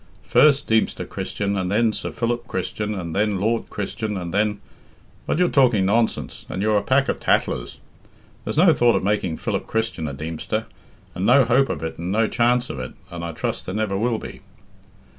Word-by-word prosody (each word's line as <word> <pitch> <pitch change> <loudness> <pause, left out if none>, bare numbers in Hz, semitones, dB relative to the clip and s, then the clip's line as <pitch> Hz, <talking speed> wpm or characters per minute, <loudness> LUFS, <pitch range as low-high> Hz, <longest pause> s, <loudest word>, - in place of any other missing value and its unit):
First 145 -1 +5
Deemster 110 0 +1
Christian, 100 0 -3
and 95 -2 -1
then 110 +2 +2
Sir - - -3
Philip 120 +1 -2
Christian, 105 +2 -3
and 85 -4 -5
then 105 -1 +1
Lord 115 +3 0
Christian, 105 +1 -3
and 85 -2 -5
then 105 0 +1 0.7
But - - 0
you're 180 0 +4
talking 125 - +3
nonsense, 110 +4 0
and - - -4
you're 105 -1 +3
a - - -4
pack 130 +6 +2
of - - -1
tattlers. - - 0 0.7
There's - - -4
no 170 0 +6
thought 120 -4 +3
of - - 0
making 95 -5 0
Philip - - -3
Christian 110 -8 -2
a 70 - -5
Deemster, 80 +3 -3 0.5
and 90 - -4
no 125 +5 +6
hope 130 +4 +3
of - - -3
it 80 - -5
and 85 +2 -3
no 110 +2 +2
chance 120 +2 +2
of 65 - -6
it, 65 - -6 0.2
and 85 -1 -6
I 85 - -3
trust 80 - -4
there 90 - -4
never 105 -2 -1
will 115 +3 0
be." - - -9
105 Hz, 200 wpm, -22 LUFS, 95-120 Hz, 0.7 s, no